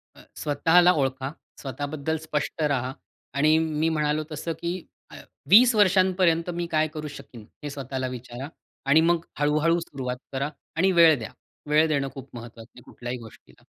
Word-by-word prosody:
अ, - - -16 0.2
स्वतःला 165 +5 +4
ओळखा. 135 -1 -1 0.3
स्वतःबद्दल 145 +3 -3
स्पष्ट 155 0 -3
राहा. 135 -3 0 0.4
आणि 155 +3 +4
मी 160 0 0
म्हणालो 150 -1 0
तसं, 160 +2 -4
की 170 0 -1 0.4
अ, - - -11 0.3
"20 240 +5 +8
वर्षांपर्यंत 185 -4 +3
मी 175 0 -2
काय 155 0 +2
करू 155 -1 -5
शकीन?", 120 -5 -12 0.2
हे 145 - -4
स्वतःला 135 -2 -4
विचारा. 125 +1 -7 0.4
आणि 140 +4 +5
मग 170 0 +2
हळूहळू 155 +3 +2
सुरुवात 130 -6 -5 0.2
करा 140 +2 -1 0.3
आणि 185 +4 +3
वेळ 165 -4 +6
द्या. 110 - -7 0.4
वेळ 155 +2 +4
देणं 140 -3 0
खूप 135 -1 -10
महत्त्वाचं 115 -1 -10
आहे, - - -12
कुठल्याही 120 +1 -7
गोष्टीला. 115 -2 -16
150 Hz, 155 wpm, -25 LUFS, 135-165 Hz, 0.4 s, 20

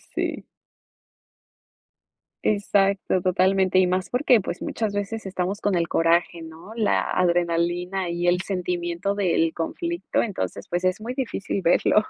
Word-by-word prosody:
Sí. - - -2 2.0
Exacto, 200 -2 +1
totalmente, 185 +1 +2
y 185 - +5
más 185 +1 -1
porque 250 -3 +3
pues 180 - -5
muchas 215 -3 -2
veces 205 +1 -3
estamos 190 +1 -2
con 205 -2 +1
el 170 -1 +1
coraje, 170 +1 +2
¿no? 165 +5 -11
La 220 -3 +2
adrenalina 175 +1 0
y 175 +1 -1
el 180 +1 +3
sentimiento 180 0 -2
del 170 -5 +1
conflicto, 340 - -2
entonces 100 - -4
pues 175 +1 -2
es 185 +3 0
muy 235 +3 -4
difícil 250 -7 -3
verlo. 175 +3 +3
185 Hz, 135 wpm, -24 LUFS, 175-200 Hz, 2.0 s, y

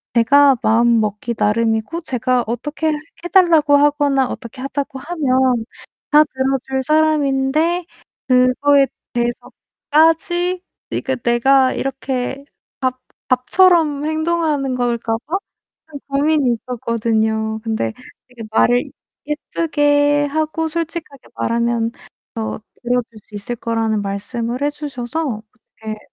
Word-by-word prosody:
제가 275 +3 +5
마음먹기 225 -1 +2
나름이고 225 +8 0
제가 255 -4 0
어떻게 295 +7 -3
해 315 +3 -4
달라고 325 -6 +5
하거나 285 -2 +2
어떻게 245 +1 -8
하자고 275 0 -4
하면 260 -6 +1 0.5
다 300 +1 +7
들어줄 265 -1 -2
사람인데 310 +3 +1 0.4
그거에 265 +2 +4 0.3
대해서까지 325 +9 0 0.3
이게 265 - -2
내가 255 +3 +3
이렇게 270 0 -3 0.3
밥 255 -1 -1 0.3
밥처럼 300 +2 +3
행동하는 315 -4 0
걸까 235 -2 -1
봐? 350 - -2 0.6
좀 285 - -7
고민이 285 -1 +2
있었거든요. 220 -2 -1
근데 220 - -2 0.4
이게 245 -2 -10
말을 245 +2 +3 0.4
예쁘게 290 -1 +1
하고 315 +2 -1
솔직하게 325 -4 -5
말하면 235 0 0
더 - - -26 0.8
들어줄 245 -1 -1
수 - - -23
있을 205 +4 -4
거라는 225 -2 -1
말씀을 230 +5 -4
해 290 - +2
주셔서 285 -3 -4 0.4
그렇게 215 -1 -6
265 Hz, 255 characters per minute, -19 LUFS, 235-300 Hz, 0.8 s, 다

